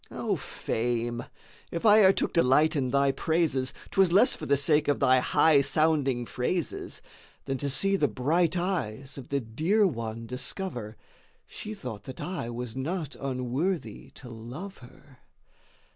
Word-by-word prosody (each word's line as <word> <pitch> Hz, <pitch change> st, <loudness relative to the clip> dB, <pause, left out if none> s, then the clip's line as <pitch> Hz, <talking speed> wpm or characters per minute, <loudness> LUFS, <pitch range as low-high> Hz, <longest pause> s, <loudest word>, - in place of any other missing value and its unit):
3. -, -, -11 dB
Oh -, -, 0 dB
Fame!—if 120 Hz, -, -4 dB
I 215 Hz, 0 st, +7 dB
e'er 190 Hz, -2 st, +7 dB
took -, -, -2 dB
delight 155 Hz, +1 st, +3 dB
in 130 Hz, -3 st, 0 dB
thy 140 Hz, +1 st, +3 dB
praises, 160 Hz, -4 st, 0 dB, 0.2 s
'Twas 190 Hz, -3 st, +3 dB
less 210 Hz, +8 st, +5 dB
for 155 Hz, -, -7 dB
the 140 Hz, -, +3 dB
sake 150 Hz, +1 st, +2 dB
of 145 Hz, -, +1 dB
thy 130 Hz, -1 st, +4 dB
high 145 Hz, +3 st, +4 dB
sounding 140 Hz, -5 st, +1 dB
phrases, 145 Hz, +9 st, -3 dB, 0.4 s
Than 135 Hz, -1 st, -3 dB
to 140 Hz, -, -2 dB
see 195 Hz, +9 st, +3 dB
the 150 Hz, -, +2 dB
bright 165 Hz, +8 st, +1 dB
eyes 140 Hz, -, -3 dB
of 130 Hz, -, -11 dB
the 140 Hz, -, 0 dB
dear 160 Hz, -, +1 dB
One 115 Hz, -, -3 dB
discover, 125 Hz, -, -4 dB, 0.5 s
She 215 Hz, 0 st, -8 dB
thought 125 Hz, -, -8 dB
that 130 Hz, -, -9 dB
I 175 Hz, -10 st, -4 dB
was 120 Hz, 0 st, -6 dB
not 150 Hz, +2 st, -3 dB
unworthy 135 Hz, +7 st, -3 dB
to 130 Hz, -, -12 dB
love 120 Hz, -, -9 dB
her. 130 Hz, +2 st, -17 dB
140 Hz, 155 wpm, -27 LUFS, 125-170 Hz, 0.5 s, I